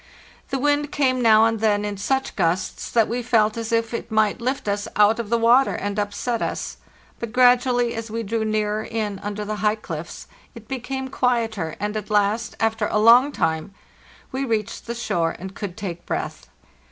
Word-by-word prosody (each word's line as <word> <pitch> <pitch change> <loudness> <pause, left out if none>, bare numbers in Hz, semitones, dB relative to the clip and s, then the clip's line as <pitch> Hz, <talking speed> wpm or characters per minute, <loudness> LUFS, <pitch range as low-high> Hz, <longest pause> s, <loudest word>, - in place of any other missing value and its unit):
The 270 - -1
wind 290 +2 +1
came 255 -3 +1
now 220 -1 +6
and 225 -1 0
then 210 -1 +2
in 205 -1 -3
such 265 +7 -1
gusts 180 +1 -1
that 225 -2 +3
we 240 +3 -2
felt 220 -3 +2
as 230 -1 -4
if 230 0 0
it 235 - -4
might 220 0 +2
lft 255 0 -2
us 205 0 -1
out 210 +2 +4
of 225 -3 -4
the 235 - +3
water 240 +4 +4
and 205 +1 -3
upset 210 +3 -2
us; - - -3 0.4
but 235 -2 -5
gradually, 245 -1 +4
as 225 0 -5
we 230 +1 -3
drew 225 +1 -1
nearer 215 0 0
in 210 -4 -3
under 205 +1 -4
the 215 +1 -3
high 210 0 +2
cliffs, 170 -6 -7 0.3
it 225 -2 -12
became 265 +1 -4
quieter, 225 -10 0
and 210 +1 -2
at 215 -1 -4
last, 210 +2 +1
after 220 -1 +1
a - - 0
long 235 +6 +6
time, 160 - -2 0.6
we 265 +1 -2
reached 220 -5 -2
the 235 - -3
shore, 170 -8 -1
and 190 +1 -8
could 190 -3 -6
take 175 -4 -6
breath. - - -4
220 Hz, 190 wpm, -23 LUFS, 205-240 Hz, 0.6 s, now